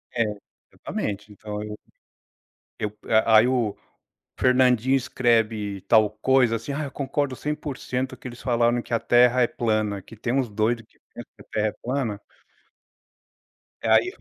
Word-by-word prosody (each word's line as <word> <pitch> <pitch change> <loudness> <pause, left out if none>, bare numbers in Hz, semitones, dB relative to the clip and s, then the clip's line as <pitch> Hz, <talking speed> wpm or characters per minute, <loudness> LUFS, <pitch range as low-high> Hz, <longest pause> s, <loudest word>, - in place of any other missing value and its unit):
É, 115 - +3 0.5
exatamente, 105 +1 -5
então 105 0 -6
eu 105 0 -7 1.0
eu 105 -1 -4 0.3
a 110 -1 +6
aí 110 +3 +6
o 120 -5 0 0.6
Fernandinho 125 0 +4
escreve 115 -6 0
tal 110 +2 +4
coisa 125 +2 +2
assim: 115 +5 -5
"Ah, 150 +2 -2
eu 140 - -7
concordo 140 -1 -2
100%" 135 -3 -4
que - - -9
eles 120 -1 -10
falaram 120 -1 +2
que - - -8
a 115 - +3
terra 125 +2 +4
é - - +3
plana, 110 -4 -1
que 115 - -14
tem 120 +2 -2
uns 130 -3 +1
doido 110 +3 0
que - - -33
pensa - - -9
que - - -15
a - - -29
terra 110 0 +1
é - - -1
plana. 125 -5 -2 1.6
Aí - - +4
120 Hz, 155 wpm, -24 LUFS, 110-130 Hz, 1.6 s, a